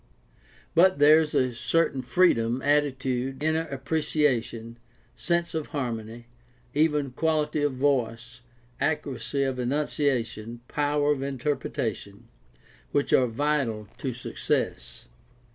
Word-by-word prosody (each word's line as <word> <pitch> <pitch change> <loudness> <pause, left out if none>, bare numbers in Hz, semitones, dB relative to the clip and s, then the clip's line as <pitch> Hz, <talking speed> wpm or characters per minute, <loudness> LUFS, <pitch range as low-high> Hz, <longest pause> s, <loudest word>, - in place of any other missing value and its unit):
But 185 +1 +5
there 150 +2 +7
is 155 -2 -2
a 130 -1 +2
certain 140 +2 +1
freedom, 125 -4 +2
attitude, 135 -2 0
inner 160 +1 +1
appreciation, 130 -5 -1 0.4
sense 170 0 -1
of 160 -2 -3
har 135 -5 -2
mony, 115 +1 -8 0.5
even 150 -2 +1
quality 155 +2 0
of 145 -2 +1
voice, 125 -3 -1 0.4
accuracy 140 -3 -1
of 135 -1 -2
enunciation, 125 -4 -1
power 145 0 +1
of 140 -2 -1
interpretation, 130 -7 -3 0.6
which 145 - 0
are 125 - +5
vital 120 -4 -1
to 135 - -2
success. 120 0 -3
135 Hz, 110 wpm, -26 LUFS, 120-150 Hz, 0.6 s, there